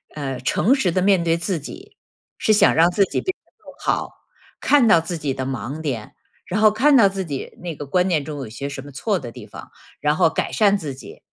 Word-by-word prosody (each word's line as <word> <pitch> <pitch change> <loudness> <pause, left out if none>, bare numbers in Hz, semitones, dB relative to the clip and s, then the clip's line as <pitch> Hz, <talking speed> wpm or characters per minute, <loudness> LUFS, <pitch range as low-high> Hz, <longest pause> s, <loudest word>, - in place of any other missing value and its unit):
呃， 135 -4 -4
诚 200 - +2
实 235 -10 +1
地 185 - 0
面 190 -2 +3
对 165 0 +1
自 170 0 -2
己， 145 - -11 0.4
是 215 - +2
想 210 - +5
让 165 +2 +5
自 200 +2 +2
己 - - -2
变 375 - -3
得 - - -35
更 - - -15
好， - - -1 0.5
看 280 -5 +4
到 170 -6 +6
自 170 +1 -5
己 145 -3 -2
的 130 -1 -4
盲 130 +3 -4
点， 125 -8 -5 0.3
然 200 +4 -1
后 215 -1 +6
看 270 +6 +4
到 205 -5 +7
自 195 0 -3
己 140 -5 -6
那 170 -3 -5
个 145 - -7
观 180 +6 +1
念 155 -6 0
中 150 -2 -6
有 125 -5 -6
些 130 +6 -6
什 140 -1 -6
么 145 +1 -12
错 195 - -1
的 120 -4 -8
地 - - -11
方， - - -11 0.3
然 150 +1 +1
后 - - +4
改 160 - -2
善 205 -2 +3
自 150 -9 -5
己。 - - -12
165 Hz, 260 characters per minute, -21 LUFS, 140-195 Hz, 0.5 s, 到